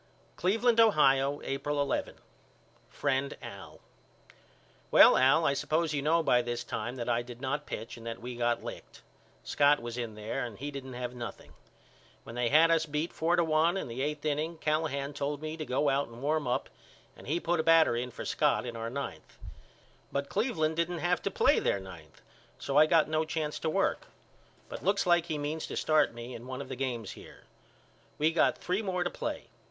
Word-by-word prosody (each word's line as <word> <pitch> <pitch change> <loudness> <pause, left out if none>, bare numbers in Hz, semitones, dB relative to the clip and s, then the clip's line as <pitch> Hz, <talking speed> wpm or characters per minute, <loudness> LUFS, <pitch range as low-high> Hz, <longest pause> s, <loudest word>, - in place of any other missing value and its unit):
Cleveland, 225 +5 +2
Ohio, 140 -10 +4
April 145 +2 -2
11. 140 - -1 0.7
FRIEND 140 -1 -1
AL: - - -10 1.1
Well - - +8
Al 135 +6 +4
I 140 - +3
suppose 155 +3 0
you 145 - 0
know 165 +3 +2
by 125 -4 +4
this 120 0 -3
time 120 +3 -4
that 120 -2 -5
I 120 0 +1
did 120 0 -10
not 145 +3 -3
pitch 115 - -6
and 115 0 -10
that 115 0 -5
we 125 +1 -7
got 120 0 0
licked. - - -9 0.4
Scott 145 +1 +3
was 120 +1 -6
in 115 -3 -4
there 105 +1 -3
and 115 -4 -6
he 145 +3 -5
didn't 135 -2 -7
have 125 0 -4
nothing. 120 -2 -8 0.7
When - - -10
they 120 0 0
had 160 +4 +6
us 165 0 +2
beat 150 +3 -2
four 165 +2 +1
to 170 - +3
one 160 +3 +2
in - - -3
the 120 +2 -5
eight 150 +1 -3
inning 155 +3 -1
Callahan 150 -3 -1
told 140 0 -3
me 155 +1 -5
to 155 -1 -5
go 130 +3 +1
out 140 +1 +1
and 120 +2 -12
warm 150 -1 0
up 125 - -1 0.5
and - - -14
he 160 +5 0
put 175 -1 0
a - - +2
batter 165 -6 +5
in 125 +1 -2
for - - -8
Scott - - +1
in 120 -1 -5
our 115 0 -4
ninth. 140 +3 -7 0.7
But 140 0 -2
Cleveland 180 -8 0
didn't 170 +1 0
have 175 +1 0
to - - -1
play - - +3
their 100 - 0
ninth 90 -5 -13 0.3
so 140 - -4
I 155 +1 +7
got 160 -1 +4
no 155 0 +1
chance 155 -1 -3
to 160 - -1
work. 195 - 0 0.6
But - - -8
looks 200 0 +2
like 175 -1 +3
he 155 - -2
means 150 +2 -3
to - - -5
start 155 -2 +3
me 120 +2 -8
in 120 +1 -9
one 130 0 -5
of - - -7
the 130 - -4
games 120 -5 -3
here. - - -13 0.7
We 155 +2 +2
got 165 - +3
three 180 +4 -1
more 185 -4 -1
to 175 - -2
play. - - -4
145 Hz, 205 wpm, -30 LUFS, 125-160 Hz, 1.1 s, Well